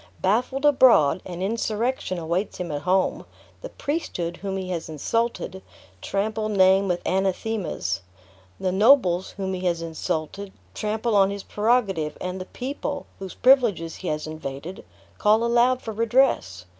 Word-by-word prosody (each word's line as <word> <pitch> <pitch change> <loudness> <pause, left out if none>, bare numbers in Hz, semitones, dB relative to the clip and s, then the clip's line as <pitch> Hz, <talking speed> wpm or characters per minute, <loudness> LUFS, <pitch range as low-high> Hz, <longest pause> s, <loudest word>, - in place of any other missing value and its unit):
Baffled 245 +8 0
abroad, 250 - +5
an 180 0 -5
insurrection 220 -1 -1
awaits 170 +4 -2
him 175 -3 -4
at 145 -1 -3
home; 185 +3 +1 0.4
the - - -7
priesthood 180 - -3
whom 195 -1 -4
he 185 -1 -5
has 170 -2 -4
insulted, 190 +5 -2 0.4
trample 215 +2 -2
name 195 -1 +4
with 180 -1 -1
anathemas; 190 - -1 0.6
the 185 - 0
nobles 190 -3 +4
whom 190 -1 -2
he 185 0 -4
has 170 -1 -1
insulted, 165 +4 -4 0.2
trample 215 +1 -1
on 195 -1 +5
his 200 0 -5
prerogative; 205 -9 0
and 180 +1 -4
the - - -6
people, 280 +5 -5
whose 190 -1 -7
privileges 230 - +3
he 185 - -7
has 150 -1 -2
invaded, 155 +2 -7 0.4
call 215 +2 +4
aloud 240 +2 +3
for 225 - -4
redress. 230 - +1
195 Hz, 145 wpm, -24 LUFS, 175-230 Hz, 0.6 s, abroad